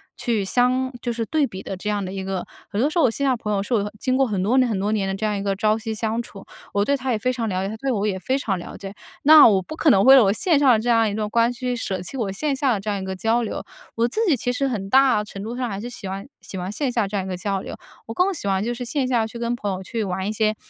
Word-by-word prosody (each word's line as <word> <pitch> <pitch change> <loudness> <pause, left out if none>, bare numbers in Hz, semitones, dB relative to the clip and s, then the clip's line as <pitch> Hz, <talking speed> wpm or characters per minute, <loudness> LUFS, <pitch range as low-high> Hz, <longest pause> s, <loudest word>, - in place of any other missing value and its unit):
去 230 -5 -1
相 255 +5 +1
就 240 - -2
是 230 -1 -2
对 305 +4 +1
比 190 -7 -7
的 195 - -5
这 210 +3 -4
样 205 -1 -1
的 185 - -6
一 195 -1 -4
个。 190 -1 -3 0.2
很 205 - -3
多 275 +6 +3
时 315 - -4
候 335 - +4
我 240 - +3
线 280 +5 -2
下 - - +4
的 250 - 0
朋 210 -2 -4
友 200 - 0
是 205 +5 -4
我 215 -4 +2
的 205 - -5
经 255 +3 0
过 270 - +4
很 205 -6 -2
多 220 +7 +2
年 255 -1 +4
很 210 -4 -1
多 205 +2 0
年 205 -3 0
的 195 - -1
这 210 +3 -3
样 210 -1 0
一 195 - -4
个 200 -1 0
朝 215 +2 +2
夕 225 0 -4
相 220 +1 -1
处， 200 -4 -12 0.3
我 200 - +2
对 280 - +2
他 260 0 -2
也 230 - +1
非 255 +3 0
常 230 -2 -2
了 185 -1 -1
解， - - -2
他 215 - -5
对 270 +4 -2
我 210 -3 0
也 195 -2 -1
非 260 +8 0
常 215 -8 -1
了 175 - -8
解。 195 0 -8 0.3
那 305 +1 +9
我 200 -4 +3
不 310 - -8
可 320 - +3
能 195 -8 +5
为 265 +1 +9
了 260 - +7
我 195 - +3
线 345 - +2
上 280 -1 +4
的 225 - +4
这 225 - -4
样 225 -2 +4
一 - - -4
段 210 0 -2
关 230 +2 +2
系， 245 - -10
去 250 -1 -1
舍 190 -6 -3
弃 185 - -7
我 215 -6 -2
线 280 +8 -1
下 270 -1 +1
的 210 - -1
这 205 +2 -5
样 205 - -1
一 - - -5
个 190 0 -4
交 225 +4 +1
流。 220 - -4 0.3
我 230 +1 +2
自 340 - -2
己 320 - +4
其 245 - -1
实 275 +2 0
很 200 -6 -4
大 260 -3 +4
程 195 -1 -8
度 230 +3 -5
上 250 -1 -2
还 195 -2 -4
是 240 - -5
喜 245 -5 -7
欢 195 +1 -5 0.2
喜 190 - -8
欢 180 +1 -4
线 260 +6 -1
下 235 -3 +1
这 200 +1 -3
样 190 - -2
一 - - -6
个 185 - -2
交 195 +1 -2
流， - - -7 0.3
我 225 - -5
更 370 +8 +2
喜 290 - -4
欢 195 0 +1
就 240 +2 -1
是 245 +1 -5
线 260 +2 -1
下 235 -3 +1
去 230 - -9
跟 235 0 -1
朋 205 -3 -3
友 185 0 -5
去 225 +3 -3
玩 190 0 -3
一 - - -1
些， 215 0 +1
220 Hz, 370 characters per minute, -22 LUFS, 200-255 Hz, 0.3 s, 那